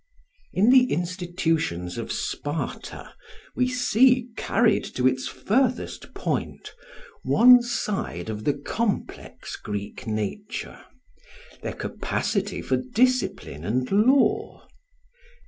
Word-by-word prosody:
In 210 +6 +4
the 255 -1 +5
institutions 170 - -1
of - - -5
Sparta 145 +2 -4 0.4
we 255 - +2
see, 250 0 +3
carried 225 -1 +2
to 125 0 +3
its 130 0 0
furthest 250 +3 -1
point, - - -3 0.5
one 250 +1 +7
side 200 - -3
of 110 -1 -5
the 145 - +1
complex 200 +9 -4
Greek 105 +3 -6
nature 200 - -4 0.8
their - - -4
capacity 205 -2 -2
for 130 - +1
discipline 195 - 0
and 125 +7 -1
law. 245 +8 +2
195 Hz, 95 wpm, -25 LUFS, -, 0.8 s, one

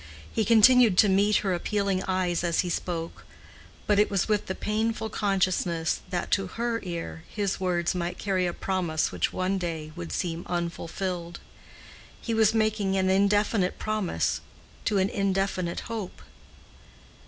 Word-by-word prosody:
He 220 - +1
continued 230 -1 +6
to 210 - +6
meet 200 +2 +3
her 190 - +2
appealing 195 +1 -1
eyes 185 -2 0
as 170 -1 +2
he 180 - -3
spoke, 170 -1 -4 0.6
but 205 -1 +3
it 210 - +4
was 195 -2 0
with 210 -2 0
the 185 - -3
painful 220 +1 -1
consciousness 185 -5 0
that 180 -2 -3
to 195 -1 +2
her 230 +4 -2
ear 170 -2 -6
his 200 -2 -2
words 175 -2 0
might 175 0 -3
carry 185 -3 0
a - - -1
promise 175 -5 -1
which - - -1
one 185 +1 -1
day 160 -3 -4
would 85 -2 -6
seem 170 - -2
unfulfilled: 175 0 -3 0.8
he 230 - -3
was 220 -1 +4
making 215 -3 +1
an 190 0 +2
indefinite 200 0 +2
promise 215 - -1 0.4
to 205 - +1
an 190 0 +3
indefinite 195 -3 -1
hope. 215 - -6
190 Hz, 150 wpm, -27 LUFS, 175-210 Hz, 0.8 s, continued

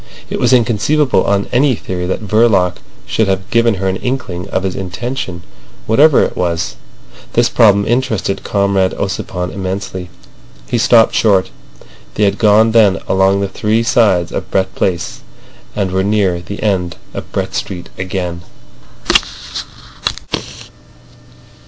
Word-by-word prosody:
It - - -2
was - - +2
inconceivable 125 +1 +2
on 100 0 +1
any 130 +1 +3
theory 90 -3 -4
that 95 - -2
Verloc 100 -5 +3 0.3
should 110 - 0
have 95 0 -1
given 115 -1 +3
her 95 0 -2
an 95 0 0
inkling 100 -9 -4
of 95 - -1
his 95 -1 -2
intention—whatever 110 - 0
it - - -2
was. 85 -9 -1 0.6
This 120 0 +3
problem 100 -4 +4
interested 110 -6 -1
Comrade 100 -2 +1
Ossipon 90 -2 -3
immensely. 95 -1 -5 0.6
He 120 - 0
stopped 115 0 +5
short. 100 -4 +2 0.6
They 105 - +1
had 100 0 +1
gone 110 +1 +5
then 105 -4 +4
along 95 +1 +2
the 100 - 0
three 105 +4 0
sides 100 -8 +2
of - - -4
Brett 95 0 0
Place, 85 -2 -2 0.6
and 95 -3 -1
were 95 +1 +1
near 100 -4 +1
the 100 +3 -7
end 95 -5 0 0.2
of - - -7
Brett - - -3
Street 90 -3 -5
again. 90 -2 -4
100 Hz, 135 wpm, -15 LUFS, 95-110 Hz, 0.6 s, stopped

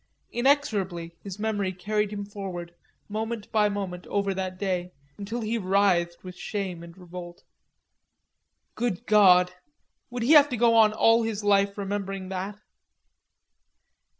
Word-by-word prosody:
Inexorably 205 - 0
his 195 -1 -7
memory 210 -3 -1
carried 210 +3 -1
him 205 -1 -4
forward, 185 -4 -7 0.3
moment 220 +1 -4
by 210 -1 +3
moment, 190 -3 -5
over 200 -1 0
that 185 -1 -4
day, 180 -2 -2 0.3
until 225 +4 -4
he 225 +1 -1
writhed 185 -3 +1
with 185 -1 -8
shame 190 -4 -4
and 170 +1 -12
revolt. 175 -1 -10 1.3
Good 240 -2 -2
god! 180 -4 +6 0.6
Would 245 -1 -4
he 250 - +2
have 295 -2 +8
to 250 - -2
go 230 0 +4
on 220 -2 +6
all 225 +2 +4
his 220 -2 -3
life 200 0 +3
remembering 195 -1 -4
that? 190 +2 -4
200 Hz, 135 wpm, -26 LUFS, 185-215 Hz, 1.3 s, have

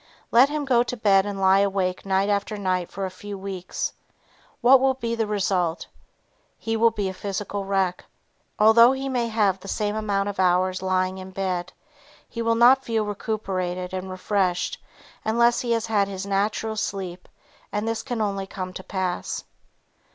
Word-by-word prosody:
Let 250 +4 +6
him 295 -1 -2
go 250 -3 +4
to 245 0 -3
bed 200 -2 +3
and 200 -1 -4
lie 190 0 +5
awake 195 -1 0
night 195 +1 +2
after 205 +1 -1
night 185 -3 -1
for 195 0 -4
a 185 - -5
few 200 +2 -8
weeks, 190 -1 -4 0.7
what 260 +2 +7
will 265 0 +2
be 235 -3 -3
the 225 -2 -1
result? 185 -5 0 0.7
He 225 0 -2
will 230 +1 +5
be 210 -3 -3
a 190 - -3
physical 200 +1 -4
wreck. 190 -2 0 0.5
Although 230 +4 +7
he 270 0 -4
may 245 -3 0
have 210 -4 +1
the 195 - -12
same 210 +1 -1
amount 205 -2 0
of 200 -2 -5
hours 185 0 +2
lying 185 0 0
in 185 0 -8
bed, 185 -2 -3 0.6
he 230 - -5
will 230 0 +2
not 250 +3 +6
feel 225 -3 0
recuperated 185 -4 -3
and 190 0 -4
refreshed 185 -1 -1 0.4
unless 235 +2 +3
he 240 - -2
has 230 -1 0
had 210 -3 +1
his 195 0 -5
natural 210 +2 -1
sleep 190 -4 -4 0.4
and 210 +2 -2
this 225 0 -1
can 245 -4 -3
only 195 -2 -2
come 185 -1 -6
to 185 - -8
pass. 185 -2 -3
200 Hz, 175 wpm, -24 LUFS, 190-225 Hz, 0.7 s, what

